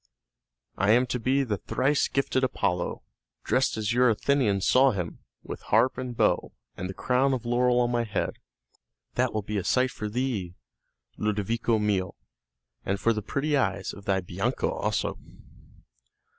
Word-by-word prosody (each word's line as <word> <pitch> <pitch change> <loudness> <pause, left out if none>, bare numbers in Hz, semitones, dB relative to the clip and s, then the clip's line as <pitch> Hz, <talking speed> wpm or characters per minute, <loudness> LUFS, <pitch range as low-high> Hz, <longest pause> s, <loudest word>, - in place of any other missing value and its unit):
"I 95 +2 +2
am 125 +2 +4
to 125 - -1
be 130 +4 +2
the 110 -6 -2
thrice 135 +9 +1
gifted 135 -1 0
Apollo, 90 -8 -1 0.4
dressed 130 +1 +1
as 110 +1 -1
your 125 0 +4
Athenians 110 -4 +1
saw 135 +2 +5
him, 90 -5 -4 0.2
with - - -7
harp 130 - +3
and 125 -2 -5
bow, - - +1 0.2
and 90 +1 -5
the 95 - -6
crown 130 +2 +2
of 120 -2 -6
laurel 125 +1 +2
on 120 0 +2
my 120 -1 +1
head. 105 -2 -3 0.7
That - - +1
will 110 -1 -2
be 105 +1 -3
a - - -4
sight 130 +5 +2
for 105 -2 -5
thee, 105 -7 -2 0.6
Ludovico 105 +2 0
mio, 100 -4 0 0.7
and 100 +1 -1
for 115 +2 +2
the 105 - -3
pretty 140 +8 -1
eyes 135 - 0
of 100 - -12
thy 95 -1 +1
Bianca 90 - -2
also." - - -2
115 Hz, 160 wpm, -27 LUFS, 100-130 Hz, 0.7 s, saw